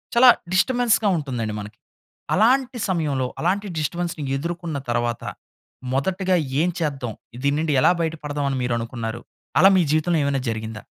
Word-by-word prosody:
చాలా 250 +2 +8 0.2
డిస్టర్బెన్స్‌గా 230 +1 +3
ఉంటుందండి 125 -8 -3
మనకి. 105 +1 -9 0.6
అలాంటి 250 +4 +3
సమయంలో, 145 -8 0
అలాంటి 195 +5 0
డిస్టర్బెన్స్‌ని 165 0 -2
ఎదుర్కొన్న 170 0 -4
తర్వాత 120 -1 -1 0.7
మొదటిగా 185 +7 +1 0.3
ఏం 175 - +2
చేద్దాం, 135 -7 -2 0.3
దీని 140 0 +2
నుండి 160 -1 0
ఎలా - - +6
బయట 165 -1 -1
పడదాం 145 -1 -2
అని 135 - -1
మీరు 125 -1 0
అనుకున్నారు? 115 0 -5 0.4
అలా 190 - +8
మీ - - +5
జీవితంలో 155 +2 +2
ఏమైనా 140 -1 0
జరిగిందా? 110 -1 -5
155 Hz, 140 wpm, -23 LUFS, 125-185 Hz, 0.7 s, చాలా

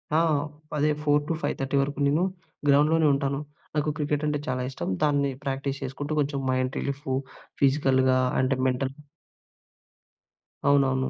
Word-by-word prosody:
ఆ! - - +5 0.6
అదే, 150 +1 +3
4:00-5:30 145 -2 0
వరకు 140 +1 -3
నేను 150 +5 +2 0.5
గ్రౌండ్‍లోనే 150 +3 +5
ఉంటాను. 140 0 0 0.4
నాకు 150 0 +1
క్రికెటంటే 150 0 0
చాలా 130 0 -1
ఇష్టం, 135 - -4
దాన్ని 145 -2 +2
ప్రాక్టీస్ 135 0 -3
చేసుకుంటూ 145 +3 -4
కొంచెం 140 -1 0
మైండ్ 130 0 0
రిలీఫు 140 -1 -2 0.5
ఫిజికల్‌గా 130 -2 +3 0.2
అంటే 130 +1 +2
మెంటల్ 130 +1 -1 1.7
అవునవును. 135 -2 +3
140 Hz, 115 wpm, -26 LUFS, 135-145 Hz, 1.7 s, ఆ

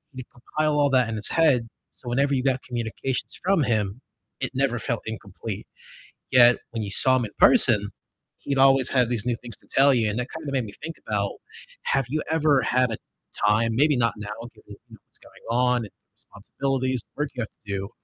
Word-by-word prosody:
he'd 130 -1 -7
compile 150 +4 -1
all 145 -1 +3
that 125 -3 +3
in 110 - -3
his 105 - +1
head, 140 -8 +3 0.2
so 125 - -16
whenever 140 +3 +1
you 130 - -1
got 130 -1 +1
communications 120 +2 -4
from 185 -5 +2
him, 110 0 -1 0.4
it 130 - -3
never 130 -3 +1
felt 115 0 -2
incomplete. 110 -1 -7 0.7
Yet 120 -1 +7
when 115 -2 -3
you 100 - -5
saw 130 +3 +5
him 120 - -1
in 105 - -8
person, 110 - +5 0.5
he'd 140 -1 -3
always 135 -1 +4
have 125 -3 +2
these 120 -2 -2
new 120 -1 0
things 120 -3 -9
to - - -25
tell 140 +1 +5
you, 115 -4 +1
and 110 +4 -2
that 125 - -3
kind 160 -1 -7
of 140 - -4
made 130 -4 0
me 100 - -10
think 165 0 -5
about 100 -2 -1 0.5
have 135 -2 +1
you 155 +1 -1
ever 150 -4 +3
had 125 0 +1
a 110 - -3 0.5
time 115 +2 +2
maybe 145 +2 +3
not 115 -1 +1
now 105 0 -7 0.3
given, - - -20
you - - -10
know, - - -13
what's - - -30
going - - -19
on 125 +1 +2
and - - -13 0.2
responsibilities 130 +3 -3
and 150 - -9
work 145 - -4
you 125 - -3
have 110 - -4 0.2
to 100 - -4
do, 100 +2 -5
125 Hz, 215 wpm, -24 LUFS, 115-135 Hz, 0.7 s, Yet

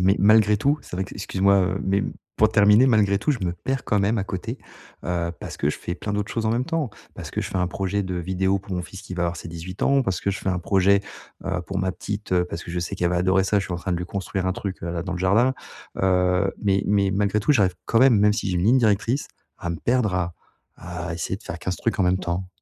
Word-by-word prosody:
mais 95 +2 +4
malgré 105 0 +5
tout, 140 +7 +1
c'est 90 - -8
vrai 95 - -1
qu - - -11
excuse 95 -1 -5
moi, 100 0 +5
heu, 95 +1 0
mais 100 +1 +1 0.3
pour 110 - +5
terminer, 105 +3 +5
malgré 105 -5 +3
tout, 150 - 0
je 140 - 0
me 85 - 0
perds 130 +8 -3
quand 105 - +1
même 105 +3 +1
à 95 - -1
côté, 95 -2 -5 0.5
heu, 85 -1 -1
parce - - -7
que - - +1
je - - -6
fais 85 - -4
plein 100 +3 -5
d'autres 105 +1 -2
choses 115 -1 -1
en - - +2
même 120 +3 +1
temps, 160 -6 -2 0.2
parce - - -8
que - - -2
je - - -4
fais - - -4
un 90 - +1
projet 95 +2 -1
de 95 -1 -4
vidéo 95 +2 0
pour 95 0 -9
mon 90 - -2
fils 95 +2 -10
qui 90 - -7
va 90 -1 0
avoir 85 0 -2
ses - - -8
18 85 +3 -7
ans, 140 0 +4
parce 95 -7 -2
que 100 - 0
je 100 - -3
fais - - -4
un 90 -1 +1
projet, 95 +2 +3 0.4
heu, 95 -2 -1
pour 95 -1 -3
ma 95 -1 0
petite, 105 +2 -5
heu, 90 -1 +3
parce 85 -1 -6
que - - -8
je 90 0 -2
sais 85 - -4
qu'elle 85 -1 +1
va 90 - +1
adorer 95 +2 +3
ça, 105 +2 +2
je 95 - -2
suis - - -5
en - - -2
train 90 +1 -3
de 85 - 0
lui 90 - -4
construire 95 -1 -3
un 95 - +1
truc, 95 0 -5
heu, 85 - -3
là 85 -1 -2
dans 95 +1 -4
le 90 - -3
jardin, 110 +8 +3 0.5
heu, 90 +1 +2
mais 100 -1 +2
mais 100 -1 +2
malgré 100 +1 +1
tout, 150 - +3
j'arrive 95 -9 +3
quand 115 - +2
même- 130 -5 +6
même 105 +1 +5
si 105 -1 -2
j'ai 90 - 0
une 85 - 0
ligne 120 +5 +5
directrice- 115 +4 +1 0.3
à 85 - -4
me 85 - -3
perdre 120 -3 +1
à 85 -2 -1 0.4
à 90 -1 -5
essayer 85 +2 -3
de 105 - -17
faire 85 - -6
15 95 - -2
trucs 115 -1 -1
en - - +4
même 90 +1 +2
temps. 90 +1 -3
95 Hz, 290 wpm, -24 LUFS, 90-105 Hz, 0.5 s, même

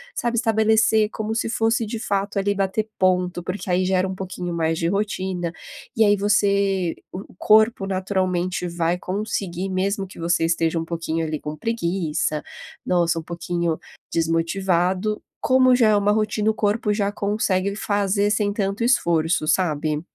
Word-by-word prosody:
sabe? 235 -1 -1
Estabelecer 220 -1 +3
como 220 0 -3
se 225 - -1
fosse 225 0 +1
de 220 +1 -5
fato 200 -2 -1
ali 200 +1 0
bater 195 +2 -1
ponto, 180 -1 +1
porque 185 +2 -5
aí 185 +1 +2
gera 185 0 +1
um 190 - -4
pouquinho 180 -2 -5
mais 165 0 0
de 165 - 0
rotina 190 -3 -2 0.4
e 225 - +4
aí 205 0 +5
você 200 -3 +1 0.2
o 185 - -6
o - - -18
corpo 215 0 +4
naturalmente 185 -2 -1
vai 170 0 0
conseguir, 190 -1 -3
mesmo 195 +1 -1
que 185 - -13
você 170 0 +1
esteja 165 0 +1
um 165 - -4
pouquinho 165 -1 -2
ali 155 -1 -3
com 150 0 -6
preguiça, 170 -7 -1 0.4
nossa, 170 -2 +1
um - - -8
pouquinho 170 -1 -2 0.3
desmotivado, 180 +4 0 0.2
como 255 0 +4
já 235 -3 +4
é 215 - +4
uma 205 0 +3
rotina 215 0 +1
o - - -5
corpo 210 +1 0
já 205 -1 0
consegue 200 -1 0
fazer 205 0 0
sem 210 -1 +1
tanto 200 +1 -1
esforço, 170 -10 +2
sabe? 155 -4 +1
190 Hz, 160 wpm, -22 LUFS, 170-210 Hz, 0.4 s, aí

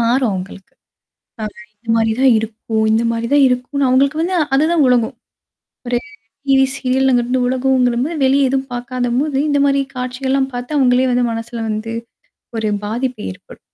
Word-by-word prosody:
மாறும் 240 +2 +2
அவுங்களுக்கு. 190 +1 -7 0.7
அ - - -1 0.3
இந்த 230 +2 -23
மாரி 225 -1 +2
தான் 265 -2 +6
இருக்கும், 220 0 -3
இந்தமாரி 230 +1 +1
தான் 285 -1 +6
இருக்குன்னு 255 +3 -1
அவுங்களுக்கு 275 +4 +2
வந்து 365 +3 -1 0.2
அதுதான் 310 +2 +3
உலகம். 245 -3 +2 0.7
ஒரு 240 0 +1 0.5
டிவி 270 -1 +5
சீரியல்ங்கிறது 255 -2 +1
உலகம்போது 255 +3 +1
வெளிய 270 0 +3
எதுவும் 270 0 -2
பார்க்காதம்போது 250 +3 -1
இந்தமாரி 280 -1 +2
காட்சிகள்லாம் 265 +2 -1
பார்த்து 245 +4 -4
அவுங்களே 255 -1 +3
வந்து 245 0 +2
மனசுல 230 +1 -5
வந்து 215 +1 -3 0.6
ஒரு 220 -1 -1 0.2
பாதிப்பு 240 +2 -3
ஏற்படும். 95 - -14
250 Hz, 135 wpm, -17 LUFS, 235-270 Hz, 0.7 s, தான்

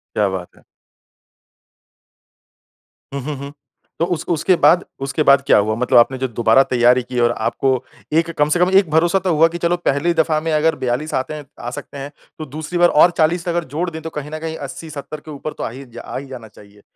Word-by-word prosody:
क्या 105 -2 +2
बात 95 -2 -5
है। - - -22 2.5
हुँ, 140 - -3
हुँ, 150 +3 -4
हुँ। 140 +1 -8 0.5
तो 170 - +2
उस 175 -2 -2
उसके 175 +2 +2
बाद, 175 +1 +4 0.2
उसके 135 +3 -1
बाद 140 -1 +5
क्या - - +5
हुआ? 105 +1 +1
मतलब 125 +2 +2
आपने 130 +2 +4
जो 130 0 -1
दोबारा 120 +2 +3
तैयारी 125 0 +3
की 125 0 -4
और 120 0 +3
आपको 130 +4 -1 0.4
एक 165 +1 +2
कम 150 0 +2
से 175 - +1
कम 180 - +4
एक 185 -5 -2
भरोसा 170 +4 +3
तो 185 -2 0
हुआ 160 +2 +5
कि 170 +1 -6
चलो 175 +1 0
पहली 170 0 0
दफ़ा 160 -1 +1
में 165 +1 -2
अगर 160 +1 +2
42 130 +5 -2
आते 130 +4 -2
हैं 150 -1 -8
आ 120 - -5
सकते 140 - -8
हैं, 140 +1 -7 0.3
तो 155 - -5
दूसरी 155 +5 -5
बार 175 0 +5
और 170 +4 +5
40 170 +3 +1
अगर 170 0 0
जोड़ 175 +2 -1
दें 160 -1 -8
तो 165 - -6
कहीं 150 -1 -7
न 155 - -5
कहीं 160 0 -5
80-70 150 +1 -8
के 155 +1 -11
ऊपर 150 +1 -6
तो - - -4
आ - - -2
ही 130 +4 -10 0.2
आ - - -7
ही 140 - -6
जा - - -16
जाना 125 -4 -9
चाहिए। 105 -1 -18
150 Hz, 230 wpm, -19 LUFS, 130-165 Hz, 2.5 s, बाद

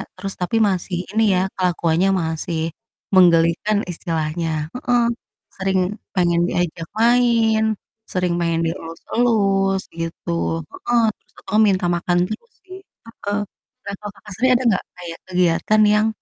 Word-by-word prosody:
Terus 195 +1 -5
tapi 180 +5 -1
masih 180 -1 -2
ini 220 +1 +2
ya - - +3 0.2
kelakuannya 175 0 +2
masih, 160 +1 -3 0.6
menggelikan 175 +3 +4
istilahnya, 165 -1 -2 0.2
heeh. 245 -1 +1 0.6
Sering 190 0 +1 0.4
pengen 175 -2 +2
diajak 170 -2 -2
main, 230 -2 +3 0.4
sering 180 -2 0
pengen 170 -1 0
dielus-elus 195 +3 0 0.2
gitu, 165 +1 -4 0.4
heeh. 240 -1 0 0.2
Terus - - -37
tau-tau 215 +2 -1
minta 185 -2 +1
makan 175 +1 0
terus 225 - -7
sih, 375 0 -10
heeh. 390 - -28 0.8
Nah, 200 - -4
kalau 210 -1 -7
Kakak 205 - -14
sendiri, 255 0 +3
ada 255 - +1
nggak 195 - +1
kayak 170 -2 -8
kegiatan 180 +4 +2
yang, 210 +1 +3
185 Hz, 130 wpm, -21 LUFS, 170-220 Hz, 0.8 s, menggelikan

